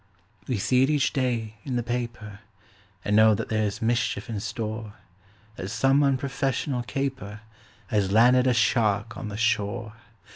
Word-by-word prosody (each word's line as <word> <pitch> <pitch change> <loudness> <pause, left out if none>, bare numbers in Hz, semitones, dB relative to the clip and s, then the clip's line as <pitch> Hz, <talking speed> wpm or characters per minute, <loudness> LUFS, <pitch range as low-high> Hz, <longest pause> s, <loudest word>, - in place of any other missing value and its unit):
We 125 - -1
see 125 +6 +2
it 135 - +3
each 145 -3 +1
day 115 -5 -1
in 130 - -3
the 120 - 0
paper, 120 -3 -5 0.7
And 105 - +1
know 110 0 +6
that - - -4
there's 110 -1 -1
mischief 115 -2 0
in 105 - -3
store; 110 0 -5 0.6
That 95 - -5
some 135 +5 +3
unprofessional 135 -1 0
caper 130 -5 -4 0.4
Has 100 -3 0
landed 125 +4 +5
a 125 - +4
shark 105 -1 +1
on - - -6
the 105 - -6
shore. 110 -1 -1
115 Hz, 150 wpm, -26 LUFS, 105-125 Hz, 0.7 s, know